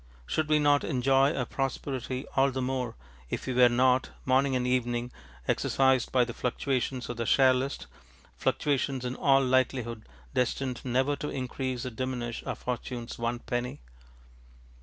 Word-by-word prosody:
Should 145 - -1
we 155 - +5
not 145 -1 +4
enjoy 135 +1 +3
our 125 - -1
prosperity 135 -1 -3
all 135 +1 +4
the 130 0 -3
more 125 -3 -2 0.3
if - - -3
we 130 - -2
were 125 0 +6
not, 125 +2 +3 0.2
morning 130 +1 +3
and 125 -1 0
evening, 120 -1 0 0.4
exercised 130 -2 +2
by 125 -1 +4
the 120 - -6
fluctuations 125 0 -1
of 120 - -5
the 115 - -2
share 130 -1 +6
list, 130 +2 -2 0.5
fluctuations 135 -3 0
in 125 - -2
all 135 -1 +4
likelihood 125 - 0 0.2
destined 125 0 -1
never 130 +3 +1
to 150 - -4
increase 130 -1 -3
or 130 - -3
diminish 120 -1 -3
our - - -2
fortunes 120 -1 -5
one 120 +1 -2
penny? 120 - -3
130 Hz, 155 wpm, -29 LUFS, 120-135 Hz, 0.5 s, were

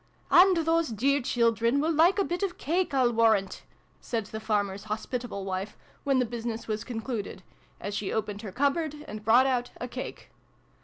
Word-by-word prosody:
" - - -32
And 370 0 +7
those 330 0 +2
dear 270 +6 +1
children 235 +1 +2
will 320 +3 +1
like 340 +5 +4
a 400 - +3
bit 350 0 -3
of 390 -3 -2
cake, 350 +5 0
/'//warrant! 230 -7 +2 0.2
" - - -37
said 225 -3 -3
the 220 +2 -6
farmer's 205 -2 -1
hospitable 220 -1 -4
wife, 190 +1 -4 0.3
when 275 -2 +2
the 250 - +2
business 230 -1 -5
was 215 0 -2
concluded, 225 -5 -5 0.4
as 205 - -5
she 205 -1 -2
opened 210 -2 -3
her 210 -4 -7
cupboard, 295 - -1
and 210 0 -7
brought 235 +4 +5
out 250 -2 0
a 245 - -4
cake. 250 +1 -7
235 Hz, 185 wpm, -28 LUFS, 215-285 Hz, 0.4 s, And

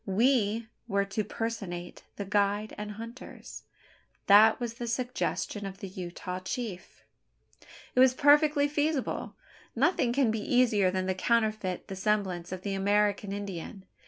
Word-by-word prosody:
We 225 +1 +2 0.2
were 200 -2 +1
to 200 +2 -2
personate 200 -5 -5
the 200 - -5
guide 205 +1 0
and 210 0 -6
hunters. 230 +4 -10 0.6
That 215 +2 +7
was 240 -2 -3
the 235 0 -6
suggestion 240 -3 -2
of 195 0 -8
the 195 - -7
Utah 180 0 -6
chief! 190 0 -6 0.9
It - - +1
was 255 0 +6
perfectly 290 0 +5
feasible. 295 -1 -1 0.4
Nothing 260 -1 +2
can 250 -2 +2
be 220 - -2
easier 225 -5 +3
than 185 0 -1
to 190 - 0
counterfeit 215 -2 0
the 195 - -6
semblance 190 -3 -1
of 185 0 -6
the 200 - -2
American 205 +1 +1
Indian. 195 -1 -6
210 Hz, 140 wpm, -29 LUFS, 195-235 Hz, 0.9 s, That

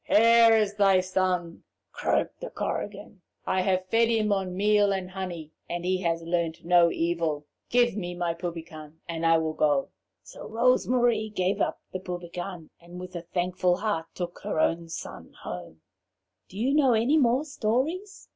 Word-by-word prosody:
'Here 230 +1 +6
is 210 -2 +1
thy 195 -2 +5
son!' 185 -2 -1 0.3
croaked - - -1
the - - -5
Korrigan. 205 -1 -5 0.2
'I 185 0 +1
have 185 0 +1
fed 225 +4 +2
him 220 -2 +1
on 185 -2 -2
meal 205 0 +3
and 190 -1 -3
honey, 175 -5 -6 0.2
and 175 0 -4
he 185 0 +1
has 165 -2 -1
learnt 170 -1 -2
no 175 -1 +5
evil. 165 -3 -1 0.2
Give 240 -3 +3
me 175 -4 -4
my 175 -1 -1
Poupican, 165 -3 -7
and 165 0 -1
I 165 0 +5
will 160 -1 -1
go.' 145 -3 +1 0.3
So - - -10
Rose 245 +3 +2
Marie 240 -3 +2
gave 190 -2 -1
up - - 0
the 185 - -3
Poupican, 175 -1 -7
and 175 +1 -11
with 180 0 -9
a 170 - -3
thankful 180 +1 0
heart 200 -6 -2
took 175 -1 -5
her - - -3
own 165 +1 +1
son - - -8
home." 80 - -8 0.7
"Do 190 - -11
you 250 +6 +1
know 280 -4 +4
any 240 +8 +3
more 250 +1 +3
stories?" 295 - -2
185 Hz, 170 wpm, -27 LUFS, 170-215 Hz, 0.7 s, Here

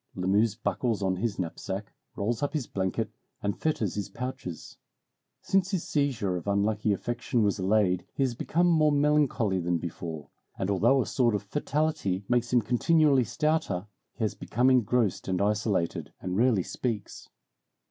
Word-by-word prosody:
Lamuse 100 +4 +2
buckles 105 0 -1
on 95 -1 +1
his 105 +1 -2
knapsack, 95 +3 -4 0.2
rolls 110 +3 -1
up 145 - -1
his 150 -6 -1
blanket, 95 -3 -2 0.3
and 100 -1 -1
fetters 115 - 0
his 100 -1 -4
pouches. 125 -10 -6 0.7
Since 190 -1 +2
his 190 -5 -2
seizure 125 -11 0
of 90 - -8
unlucky 105 +1 +1
affection 120 +3 -1
was 100 0 +1
allayed, 95 -2 +2
he 135 - +1
has 130 -2 0
become 165 +8 0
more 155 -3 +4
melancholy 145 -9 +2
than 85 0 0
before, 80 -2 -6 0.3
and 95 +1 -1
although 120 +7 +3
a - - -8
sort 120 -4 +2
of 100 - -2
fatality 145 - -1
makes 120 -1 +1
him 120 -2 +4
continually 140 +3 +3
stouter, 120 - 0 0.3
he 120 - -4
has 110 - 0
become 125 +3 +1
engrossed 120 -4 +2
and 95 -1 0
isolated, 105 -4 0
and 90 0 -3
rarely 115 -3 +3
speaks. 110 -2 -4
110 Hz, 155 wpm, -28 LUFS, 95-130 Hz, 0.7 s, more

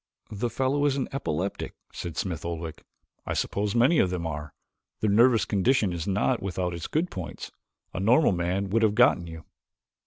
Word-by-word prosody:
"The 110 +3 -2
fellow 135 +4 0
is 140 -2 +2
an 135 - -1
epileptic," 95 - -3 0.2
said 85 -2 -6
Smith 85 -5 -3
Oldwick. 85 -1 -5 0.5
"I - - -1
suppose 100 +1 -1
many 130 +8 +4
of 95 - +3
them 90 -2 -3
are. 75 -2 -5 0.5
Their 105 - +1
nervous 115 +2 +5
condition 105 -1 +2
is 85 0 -4
not 105 +5 +1
without 90 -2 -2
its 85 -1 -5
good 165 +4 -1
points 90 -3 -7 0.4
a 95 - -3
normal 120 +9 +4
man 95 +2 -1
would 115 +2 +2
have 105 -2 +3
gotten 110 -7 +4
you." 80 -1 -9
100 Hz, 180 wpm, -27 LUFS, 85-120 Hz, 0.5 s, nervous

